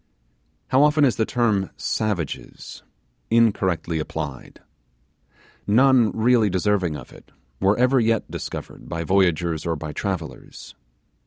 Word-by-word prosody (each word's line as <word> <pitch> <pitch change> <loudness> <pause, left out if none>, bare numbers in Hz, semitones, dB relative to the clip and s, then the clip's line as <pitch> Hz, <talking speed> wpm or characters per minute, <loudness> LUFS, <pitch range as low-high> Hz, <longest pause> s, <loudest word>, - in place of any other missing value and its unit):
How 130 - +4
often 150 0 +4
is 125 - +1
the 110 - 0
term 105 -6 +1
'savages' 100 -9 -4 0.5
incorrectly 95 -8 +1
applied! 70 -3 -6 1.1
None 125 +1 +4
really 115 -1 +3
deserving 95 -3 0
of 65 - -12
it - - -17 0.3
were 100 +2 +2
ever 125 +2 +3
yet 115 -1 0
discovered - - -7
by 85 -1 -3
voyagers 85 -3 +1
or 85 -1 -1
by 75 0 -6
travellers. 85 -7 -6
100 Hz, 115 wpm, -23 LUFS, 85-115 Hz, 1.1 s, How